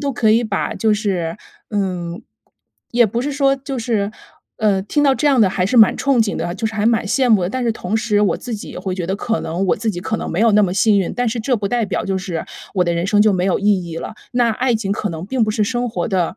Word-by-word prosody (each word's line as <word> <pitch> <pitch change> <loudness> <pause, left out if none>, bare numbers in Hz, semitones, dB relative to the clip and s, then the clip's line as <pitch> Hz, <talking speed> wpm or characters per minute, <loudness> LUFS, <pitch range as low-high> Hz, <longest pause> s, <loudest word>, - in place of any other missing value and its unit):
都 280 -2 -1
可 220 -3 +3
以 230 - +3
把 215 -3 -2
就 220 -1 +1
是 190 -5 -1 0.3
嗯， 180 -4 -3 0.7
也 240 -1 +4
不 230 +4 -2
是 290 - -2
说 275 -1 +2
就 275 0 -6
是 220 -3 -1 0.5
呃， 200 -3 +1
听 290 +9 -1
到 275 -2 +4
这 295 +2 +1
样 270 -4 +4
的 200 - +5
还 185 -1 -1
是 220 +7 0
蛮 220 -2 +7
憧 275 -1 +1
憬 220 -3 +2
的， 175 - -3
就 220 - -2
是 220 - -5
还 210 0 -1
蛮 225 -2 +2
羡 255 +4 +2
慕 210 -4 +5
的。 175 - -1
但 255 +3 -2
是 235 - +1
同 220 0 -2
时 215 -2 +1
我 205 - +2
自 245 - -7
己 210 - -6
也 - - -7
会 185 0 -3
觉 175 - -3
得， 190 - -1
可 225 +2 -2
能 175 +4 -2
我 - - +2
自 220 +1 -2
己 175 - -5
可 220 +4 -2
能 - - -5
没 170 - -2
有 230 0 +5
那 210 0 +5
么 180 -1 -2
幸 205 0 +3
运， 185 - -2
但 245 -1 0
是 230 +2 -3
这 245 +3 0
不 205 -2 -3
代 235 -2 0
表 - - -2
就 190 -1 -1
是 180 -3 -4 0.3
我 180 - +3
的 170 - 0
人 170 +2 -1
生 205 +1 +4
就 215 -2 +4
没 180 -1 0
有 190 0 +1
意 200 -3 +2
义 165 -1 -7
了， 165 - -6 0.2
那 245 -1 +2
爱 245 +2 0
情 215 -3 -2
可 205 0 -1
能 165 0 -5
并 240 +2 0
不 215 - -1
是 215 - 0
生 245 +3 -1
活 230 - -2
的 185 -4 -1
215 Hz, 310 characters per minute, -19 LUFS, 190-235 Hz, 0.7 s, 蛮